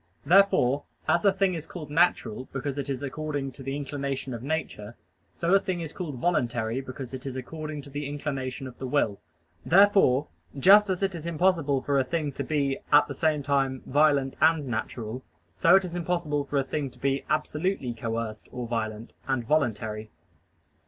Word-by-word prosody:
Therefore, 145 -6 +4 0.2
as - - +3
a 200 - +7
thing 195 -1 +1
is 160 -2 -5
called 155 -5 -8
natural 150 -7 +1
because 140 +1 -3
it 140 - -4
is 135 0 -3
according 145 -1 -3
to 135 - -13
the 135 +1 -3
inclination 140 -2 -4
of 115 - -6
nature, 125 -7 -4 0.4
so 170 +2 0
a 195 - +7
thing 185 -2 -3
is 160 -3 -5
called 165 -7 -5
voluntary 120 -5 0
because 130 -1 -8
it 130 0 -6
is 130 - -5
according 155 +3 -6
to 140 - -13
the 145 0 -4
inclination 135 -2 -4
of 125 -2 -10
the 130 - -4
will. 125 -7 +1 0.4
Therefore, 185 -7 +5 0.3
just 200 +7 +7
as 185 +1 -1
it 195 -1 +1
is 165 -1 -6
impossible 165 -5 +1
for 140 -1 +2
a - - +3
thing 150 +2 -2
to - - -4
be 140 -3 0
at 145 0 +6
the 140 - -5
same 150 0 +1
time 135 -2 0
violent 145 -1 +3
and 160 -1 +4
natural, 115 0 -4 0.3
so 170 +3 +5
it 195 -1 +4
is 175 - -7
impossible 170 -4 -1
for 140 - -2
a 135 - +3
thing 140 +1 -3
to 125 - -17
be 135 +2 0
absolutely 155 -3 -1
coerced 115 -1 -4
or 125 -1 -5
violent, 110 -1 -4
and 130 -3 0
voluntary. 110 -6 0
140 Hz, 185 wpm, -27 LUFS, 130-160 Hz, 0.4 s, a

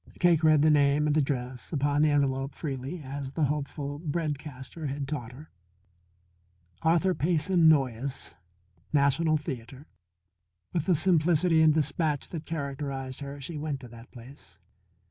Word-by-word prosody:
Cake 170 -2 +4
read 155 -2 +5
the 155 - +5
name 145 0 +3
and 150 -1 +1
address 130 -5 -2
upon 145 -1 +1
the 155 - +4
envelope 135 -1 0
freely 140 +2 -5
as 135 0 -6
the 160 - 0
hopeful 145 0 -2
bread 155 -2 -2
caster 145 +2 -8
had 140 0 -4
taught 125 -6 -4
her: 150 +5 -13 1.3
Arthur 170 +3 +3
Payson 170 +1 +2
Noyes, 135 -3 0 0.6
National 155 +2 +3
Theatre. 130 -1 -7 0.9
With 170 -1 -1
the 180 - +4
simplicity 165 -1 +3
and 160 -1 +6
dispatch 150 -1 0
that 160 -2 -7
characterized 140 -4 -4
her, 140 0 -7
she 150 +3 -6
went 145 -2 -3
to 125 - -9
that 115 +1 -13
place. 120 - -14
145 Hz, 145 wpm, -28 LUFS, 135-155 Hz, 1.3 s, and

